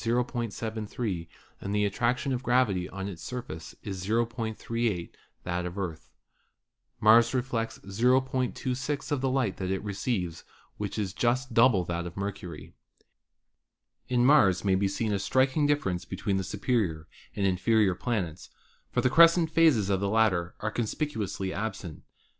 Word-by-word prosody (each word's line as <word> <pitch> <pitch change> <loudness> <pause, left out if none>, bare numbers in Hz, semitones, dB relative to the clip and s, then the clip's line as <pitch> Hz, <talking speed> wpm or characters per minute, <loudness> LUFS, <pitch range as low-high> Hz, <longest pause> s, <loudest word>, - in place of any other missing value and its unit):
73 115 -5 -2 0.3
and 100 +1 -3
the 105 0 +2
attraction 125 +6 0
of 125 - -2
gravity 120 -8 +1
on 95 0 -5
its 90 -5 -7
surface 80 -11 -7
0.38 110 0 -2 0.3
that 90 0 -2
of 90 0 -5
the 100 - -3
Earth. 80 -9 -6 0.9
Mars 115 +4 +6
reflects 120 -3 -2
0.26 130 +5 0
of 145 -3 0
the 135 - +1
light 130 -7 0
that 95 -1 -3
it 95 +1 -2
receives, 95 -4 -3 0.3
which 100 -1 -4
is 100 -4 -2
just 125 +2 0
double 115 -6 +5
that 85 +1 -3
of 85 - -10
Mercury. 95 -5 -6 1.3
In 125 -1 +2
Mars 105 - +5
may 95 - +3
be 95 +1 +2
seen 105 +2 -1
a 100 - 0
striking 130 +7 +2
difference 95 -12 0
between 95 +1 -2
the 95 - -1
superior 95 -5 -1 0.3
and 100 - 0
inferior 95 +2 +3
planets, 90 -6 -3 0.4
for - - 0
the 130 - +3
crescent 165 +1 +6
phases 145 -12 +4
of 95 - +2
the 100 0 -1
latter 100 -6 +2
are 105 - -1
conspicuously 110 - -2
absent. 95 -6 -5
105 Hz, 145 wpm, -28 LUFS, 95-125 Hz, 1.3 s, Mars